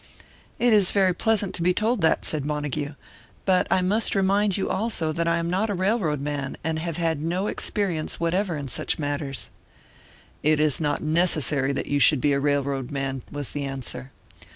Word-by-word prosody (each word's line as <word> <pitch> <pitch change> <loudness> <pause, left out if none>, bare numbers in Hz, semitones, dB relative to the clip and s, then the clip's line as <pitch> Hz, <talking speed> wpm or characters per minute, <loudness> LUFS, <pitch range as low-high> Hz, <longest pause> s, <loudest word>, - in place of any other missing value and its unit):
"It 240 -1 +3
is 205 -3 +6
very 190 -2 +3
pleasant 210 +1 +1
to - - -5
be 180 +1 +2
told 220 +1 +1
that," 160 - +2
said 155 -3 -1
Montague. 150 0 -3 0.5
"But 185 -2 +3
I 185 - +3
must 210 +5 +1
remind 195 +1 +2
you, 195 - -1
also, 195 -7 -1
that 165 +2 -1
I 170 0 +2
am 170 0 -2
not 190 +5 0
a 205 - -1
railroad 185 - 0
man, 140 -1 -3
and 160 0 -1
have 165 0 -3
had 165 -3 0
no 175 +5 -1
experience 190 -6 -2
whatever 170 +1 0
in 140 -1 -5
such 125 - -1
matters 145 -2 -3 0.4
" - - -26 0.3
"It 155 0 +2
is 155 0 +2
not 145 -2 -1
necessary 155 -4 +2
that - - -3
you 145 - 0
should 145 0 +5
be 145 +2 +2
a 140 - +1
railroad 140 -2 0
man," 135 -2 -3
was 145 -2 -4
the 145 - -3
answer. 135 -1 -3
160 Hz, 195 wpm, -24 LUFS, 145-190 Hz, 0.5 s, is